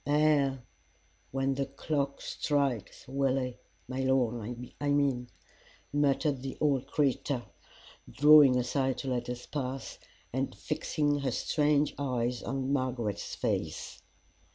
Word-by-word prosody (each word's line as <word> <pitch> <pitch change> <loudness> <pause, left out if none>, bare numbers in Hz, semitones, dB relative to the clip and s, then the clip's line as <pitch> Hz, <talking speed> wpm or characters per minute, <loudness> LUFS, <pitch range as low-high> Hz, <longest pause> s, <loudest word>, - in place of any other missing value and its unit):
"Ay 145 -2 +3 0.7
when 135 +1 0
the 135 0 -2
clock 140 0 -2
strikes, 140 -8 -1
Willie 130 -2 0 0.3
my 130 +1 -4
Lord, 120 -3 0 0.2
I 145 - 0
mean," 140 -4 +1 0.6
muttered 145 -1 +2
the 135 0 -5
old 140 -3 +1
creature, 140 -3 0 0.7
drawing 145 -3 +7
aside 130 +1 0
to 135 - -4
let 125 -1 -2
us 125 0 -5
pass, 135 -2 -4 0.3
and 135 +1 -1
fixing 150 -1 0
her 140 -1 0
strange 145 +4 +2
eyes 125 -3 -1
on 135 0 -2
Margaret's 125 -6 -2
face. - - -3
135 Hz, 115 wpm, -30 LUFS, 125-145 Hz, 0.7 s, drawing